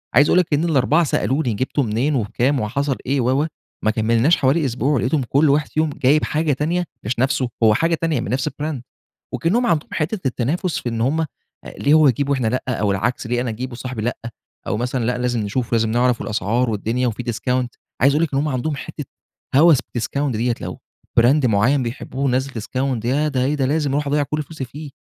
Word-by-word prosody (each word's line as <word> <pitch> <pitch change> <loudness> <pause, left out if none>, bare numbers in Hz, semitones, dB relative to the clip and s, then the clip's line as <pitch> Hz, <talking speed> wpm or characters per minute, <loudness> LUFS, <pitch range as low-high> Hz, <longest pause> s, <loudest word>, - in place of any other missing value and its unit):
عايز 145 +3 +6
أقول 185 - +5
لِك 165 -4 0
إن 150 +3 +2
ال4 150 +2 +3
سألوني 135 -3 0
جبته 130 +5 -1
منين، 120 +7 0
وبكام 125 +4 0
وحصل 135 +5 -1
إيه، 135 0 +1
و 130 +5 +2
و - - -1 0.4
ما 110 - +4
كملناش 115 +8 +2
حوالي 140 +3 +2
أسبوع، 130 +4 0
ولقيتهم 130 +4 +1
كل 145 +2 +4
واحد 150 +2 +2
يوم 155 -1 +3
جايب 145 +2 +2
حاجة 155 -1 0
تانية، 165 +6 0 0.2
مش 115 +3 -2
نفسه، 130 -1 +1
هو 110 -1 +6
حاجة 165 +7 +2
تانية 160 -5 -1
من - - -5
نفس 130 0 0
الbrand. 150 -4 -4 0.5
وكأنّهم 230 +9 +1
عندهم 160 -8 +1
حتّة 170 +6 -2
التنافس، 155 +9 -1
في 120 - -4
إن 115 -1 -3
هم 155 +7 +1 0.5
ليه 145 +2 +3
هو 155 -3 +6
يجيب 140 +3 0
وإحنا 130 -5 +1
لأ، 125 +3 0
أو 105 -5 0
العكس 115 +5 -1
ليه 120 +1 0
أنا 125 - -2
أجيب 125 +4 -5
وصاحبي 120 -2 -5
لأ، 120 +1 -1 0.5
أو - - -1
مثلًا 125 +1 -2
لأ 125 +1 0
لازم 120 -2 0
نشوف، 110 +4 -2
ولازم 115 -1 +2
نعرف 120 +1 +2
الأسعار 115 +3 0
والدنيا 115 +4 -1
وفي 115 +2 -4
discount، 125 +2 -1 0.3
عايز 140 +3 +5
أقول 155 - +2
لِك 145 - -6
إن - - +2
هم 150 +2 0
عندهم 145 +3 -2
حتّة 150 0 -7 0.5
هوس 160 -1 +7
بالdiscount 140 +5 -2
ديّة، 120 +1 0
لو - - -6 0.4
brand 130 +3 +4
معيّن 120 +6 +3
بيحبوه 135 +3 -3
نزّل 130 +2 -1
discount، 130 -2 -2
ياه! 145 +5 +1
ده 130 -3 0
إيه 145 +3 +1
ده! 135 -3 0
لازم 145 -1 0
أروح 145 +1 0
أضيّع 145 +1 +1
كل 150 +2 -2
فلوسي 150 -3 -7
فيه، 145 +3 -9
130 Hz, 210 wpm, -20 LUFS, 120-150 Hz, 0.5 s, هوس